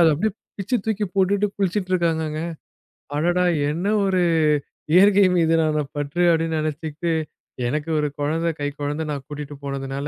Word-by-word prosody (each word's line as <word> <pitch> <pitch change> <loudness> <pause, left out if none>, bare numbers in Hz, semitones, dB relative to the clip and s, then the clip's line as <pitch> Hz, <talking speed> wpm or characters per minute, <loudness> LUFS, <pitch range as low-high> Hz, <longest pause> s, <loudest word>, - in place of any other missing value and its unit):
அத 165 - +7
அப்படியே 210 +8 0 0.3
பிச்சி 200 +6 0
தூக்கி 215 -1 0
போட்டுட்டு 195 +1 +2
குளிச்சிட்டு 195 -1 -1
இருக்காங்கங்க. 160 -3 0 0.8
அடடா! 175 +4 +2 0.2
என்ன 170 +6 -2 0.2
ஒரு 190 -2 +2 0.7
இயற்கை 200 +2 +6
மீதினான 160 -2 +2
பற்று 145 +4 -2
அப்படின்னு 165 -1 +1
நினைச்சுகிட்டு 155 +2 -3 0.6
எனக்கு 150 +5 -2
ஒரு 150 - +1
குழந்தை, 160 +3 0
கைக்குழந்தை 145 +2 -3
நான் 140 -2 -5
கூட்டிட்டு 145 0 -7
போனதுனால 140 0 -4
160 Hz, 130 wpm, -22 LUFS, 150-180 Hz, 0.8 s, அத